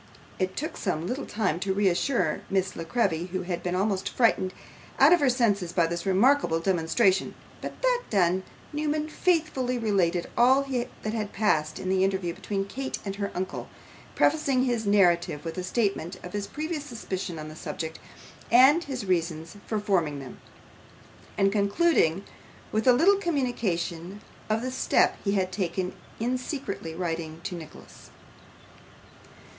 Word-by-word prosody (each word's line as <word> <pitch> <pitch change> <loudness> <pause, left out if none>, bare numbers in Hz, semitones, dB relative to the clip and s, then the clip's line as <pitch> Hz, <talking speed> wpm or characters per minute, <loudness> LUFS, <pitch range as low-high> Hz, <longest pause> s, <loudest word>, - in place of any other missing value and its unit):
It 185 -1 -1
took 310 +3 -3
some 170 -5 -2
little 255 +9 -3
time 200 -6 -1
to 190 +1 -1
reassure 205 +6 +1
Miss 190 -1 0
La 165 - -4
Creevy, 175 -4 0
who 185 0 -3
had 175 -1 -3
been 180 0 -2
almost 195 0 0
frightened 225 -6 +2 0.5
out - - +7
of 350 - +5
her 285 -3 +3
senses 210 -8 +1
by 170 - +3
this 170 +2 -3
remarkable 195 -2 +3
demonstration; 185 +3 +2 0.3
but - - -6
that - - +3
done, 185 -2 +2 0.3
Newman 300 0 -1
faithfully 310 -8 +1
related 185 -6 +1
all 260 +3 +5
that 245 -5 -4
had 215 -2 -3
passed 155 -7 +1
in - - -5
the 190 0 +3
interview 190 -3 0
between 195 +2 -3
Kate 265 +6 -4
and 195 0 -4
her 200 -1 -2
uncle, 185 +1 -4 0.5
prefacing 280 -4 +3
his 240 -4 0
narrative 175 -6 +3
with 165 - -4
a - - -3
statement 195 -3 -1
of 180 - -8
his 205 -1 -3
previous 310 0 -4
suspicions 195 - -5
on 155 0 -6
the 155 - -9
subject, 160 0 -5 0.5
and 270 +8 +6
his 255 -6 -4
reasons 170 -1 -1
for 215 - -1
forming 175 -8 0
them; 135 -2 -10 1.0
and 195 0 +3
concluding 200 - +2 0.5
with 220 +4 0
a 330 +11 +6
communication 205 - -2 0.3
of 220 +2 +1
the 255 - -2
step 260 - +2
he 200 - +1
had 185 -2 0
taken 185 -1 -2 0.3
in 250 +3 0
secretly 205 - -5
writing 165 -2 -3
to - - -4
Nicholas. 165 -3 -11
195 Hz, 155 wpm, -27 LUFS, 175-250 Hz, 1.0 s, out